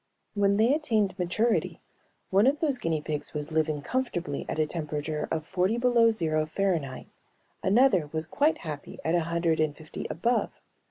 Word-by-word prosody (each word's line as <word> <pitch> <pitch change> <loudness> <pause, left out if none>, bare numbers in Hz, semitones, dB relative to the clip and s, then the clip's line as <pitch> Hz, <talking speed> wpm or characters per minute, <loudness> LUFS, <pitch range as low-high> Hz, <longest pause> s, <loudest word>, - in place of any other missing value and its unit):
When 200 -1 +2
they 230 +5 +4
attained 220 -10 +1
maturity 215 +7 0 0.5
one 200 +5 +5
of 285 +2 +2
those 285 -6 0
guinea 160 -2 -1
pigs 150 0 -4
was 150 +1 -4
living 155 -2 0
comfortably 180 - -2
at - - -2
a 155 - +3
temperature 150 -1 -3
of 155 -1 -2
forty 185 +6 0
below 240 -1 +4
zero 155 -7 0
Fahrenheit, 160 -7 -1 0.6
another 195 - +3
was 160 0 -2
quite 290 - +1
happy 150 -2 -6
at 160 - +1
a 170 -2 +2
hundred 170 -1 0
and 155 -2 0
fifty 155 -1 -7
above. 235 +9 0
170 Hz, 165 wpm, -28 LUFS, 155-225 Hz, 0.6 s, one